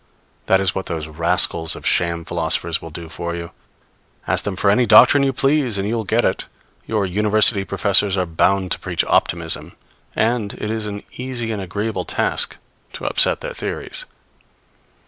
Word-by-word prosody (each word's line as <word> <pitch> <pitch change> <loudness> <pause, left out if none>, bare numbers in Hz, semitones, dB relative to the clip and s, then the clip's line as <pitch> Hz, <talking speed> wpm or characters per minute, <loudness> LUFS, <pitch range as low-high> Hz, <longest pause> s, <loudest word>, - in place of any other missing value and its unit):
That 95 - +4
is 95 -2 +1
what 95 - -4
those 80 -2 -4
rascals 85 +1 +1
of - - -11
sham 85 -1 +1
philosophers 85 -1 -1
will 80 - -8
do 80 +1 -8
for 85 +1 -5
you. 85 -1 -7 0.7
Ask - - -1
them 100 -2 -2
for 100 +2 +2
any 120 +3 +2
doctrine 145 - +7
you 135 -1 +2
please, 135 -4 +1
and 100 +1 -2
you 115 - -1
will 110 -2 -3
get - - +1
it. - - -1 0.4
Your 105 -3 0
University 105 +2 +3
professors 100 0 +2
are 90 - +1
bound 95 +3 +1
to - - -1
preach - - -1
optimism; 85 -1 0 0.4
and 110 -2 0
it 105 - -5
is 110 -1 -2
an 100 0 -6
easy 125 -3 -4
and 105 -2 -3
agreeable 105 +4 -3
task - - -1 0.4
to - - -7
upset - - +2
their - - -5
theories. - - -3
100 Hz, 175 wpm, -20 LUFS, 85-110 Hz, 0.7 s, doctrine